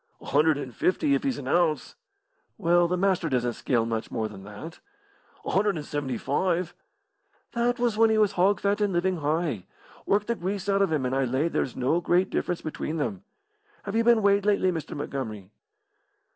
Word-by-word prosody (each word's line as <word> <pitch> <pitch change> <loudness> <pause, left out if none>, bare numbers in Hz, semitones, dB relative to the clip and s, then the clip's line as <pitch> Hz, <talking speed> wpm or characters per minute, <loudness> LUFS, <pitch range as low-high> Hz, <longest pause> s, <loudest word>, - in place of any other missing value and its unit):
"A - - -14
hundred 150 +1 +3
and 130 -4 -6
fifty, 280 +10 +1
if - - +2
he's 270 -3 -1
an 130 - -7
ounce." 155 -2 +1 0.6
"Well, 175 +1 +3
the 180 +1 -1
Master 185 -3 +1
doesn't 125 -2 0
scale 115 0 0
much 115 -1 -3
more 110 -1 -2
than 100 -3 -11
that." 105 +11 -9 0.7
"A - - -2
hundred 200 0 +2
and 150 - -5
seventy 140 -5 -3
five." 175 +6 -1 0.8
"That 240 +1 0
was 235 -3 0
when 225 0 +6
he 220 - +2
was 210 -2 +4
hog 190 +3 +2
fat 205 +1 +1
and 205 -2 +1
living 180 +1 +1
high. 150 - -1 0.4
Work 205 +1 +2
the 235 - 0
grease 195 -1 -4
out 200 0 +2
of 195 - +2
him 145 -5 0
and 125 - -1
I 135 0 +2
lay 130 +7 0
there's 130 - -2
no 135 +7 +1
great 180 +2 +2
difference 175 - -1
between 155 0 -4
them. 190 +5 -3 0.6
Have 200 +1 -5
you 230 - +3
been 230 -2 +4
weighed 200 0 +4
lately, 200 -2 +2
Mr. 160 -3 -5
Montgomery?" 110 -9 -5
175 Hz, 200 wpm, -26 LUFS, 140-200 Hz, 0.8 s, when